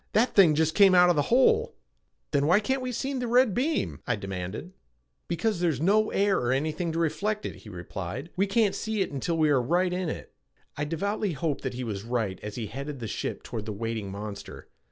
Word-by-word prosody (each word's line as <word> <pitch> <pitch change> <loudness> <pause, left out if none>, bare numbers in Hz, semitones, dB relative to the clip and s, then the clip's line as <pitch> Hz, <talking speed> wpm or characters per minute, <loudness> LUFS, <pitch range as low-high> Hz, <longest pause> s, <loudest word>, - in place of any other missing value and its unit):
That 235 +4 +3
thing 170 -7 +6
just 160 +1 +2
came 195 -1 +6
out 180 0 +7
of - - +1
the 145 - +3
hole!" 440 - +4 0.6
"Then 145 0 +2
why 180 +5 +5
can't 265 +5 -1
we 255 0 -3
see 265 +4 -3
the 250 -2 -2
red 245 -2 +4
beam?" 295 - -1
I 120 - +2
demanded. 95 - -6 0.5
"Because 175 +3 -1
there's 165 -6 +1
no 210 +7 +3
air 200 0 +2
or 120 0 0
anything 155 +5 -1
to - - -2
reflect 170 +7 -1
it," - - -5
he 110 - -13
replied. 95 - -6
"We 195 +2 +2
can't 210 -1 +2
see 220 -2 -2
it - - -1
until 165 +4 -2
we 155 -2 +3
are 135 -3 +4
right 175 +8 +1
in 180 -2 -1
it." - - -7 0.4
I 145 - -2
devoutly 200 +5 -1
hoped 150 0 -2
that 130 -2 -4
he 125 - -4
was 105 -5 -4
right 115 -5 -2
as 105 0 -6
he 115 - -3
headed 140 +6 -6
the 115 - -4
ship - - -4
toward 110 -1 -6
the 105 - -3
waiting 110 -1 -3
monster. 100 0 -8
160 Hz, 220 wpm, -27 LUFS, 120-205 Hz, 0.6 s, out